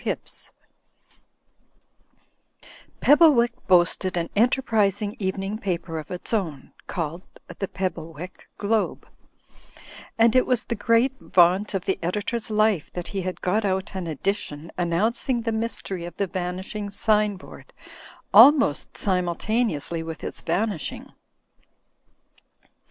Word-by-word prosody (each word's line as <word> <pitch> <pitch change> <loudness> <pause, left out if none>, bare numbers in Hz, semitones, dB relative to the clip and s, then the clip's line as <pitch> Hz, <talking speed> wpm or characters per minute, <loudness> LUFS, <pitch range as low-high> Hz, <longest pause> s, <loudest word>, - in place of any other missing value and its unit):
HIBBS - - -5 2.5
Pebblewick 285 -6 +6 0.2
boasted 180 0 +3
an 170 -1 -2
enterprising 215 -3 +1
evening 195 +2 -3
paper 170 -5 -3
of 155 - -9
its 180 +5 -5
own, 165 -11 -2
called 165 0 -4 0.4
"The 195 - -1
Pebblewick 175 -2 -6
Globe/' 215 +1 -1 1.1
and 230 +1 +4
it 255 - +4
was 250 -2 +1
the - - -2
great 230 +3 +2
vaunt 185 +4 +3
of 185 - -2
the 190 - -1
editor's 210 +6 -2
life 215 -6 +1
that 175 -1 -5
he 195 -2 -3
had 185 0 -5
got 210 +5 +1
out 190 0 -1
an 185 -3 -4
edition 160 -1 -3
annoimcing 220 +8 0
the 225 - -1
mystery 220 -5 -3
of 175 - -9
the 200 - +1
vanishing 185 +3 -4
sign 210 0 +2
board, 340 - -14 0.6
almost 275 - +6
simultaneously 180 - -1
with 160 -1 -7
its - - -5
vanishing. 200 -6 -2
195 Hz, 115 wpm, -24 LUFS, 175-220 Hz, 2.5 s, Pebblewick